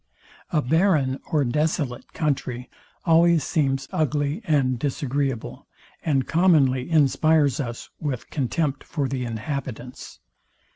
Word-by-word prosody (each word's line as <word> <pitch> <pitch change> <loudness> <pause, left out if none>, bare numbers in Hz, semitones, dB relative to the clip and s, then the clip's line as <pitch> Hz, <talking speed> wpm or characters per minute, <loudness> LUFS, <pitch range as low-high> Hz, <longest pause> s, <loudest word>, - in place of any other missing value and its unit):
A 155 -4 +1
barren 150 -3 +2
or 150 -3 +2
desolate 145 -1 -1
country 130 -5 -2 0.3
always 170 -1 +5
seems 135 -3 0
ugly 150 - 0
and 135 - +1
disagreeable, 135 -3 -2 0.4
and 140 -5 +1
commonly 155 -7 +3
inspires 155 -2 +3
us 120 -4 -4
with 140 -6 -4
contempt 140 +1 -1
for 145 -4 -2
the 130 -1 -3
inhabitants. 125 +1 -6
140 Hz, 105 wpm, -24 LUFS, 130-155 Hz, 0.4 s, always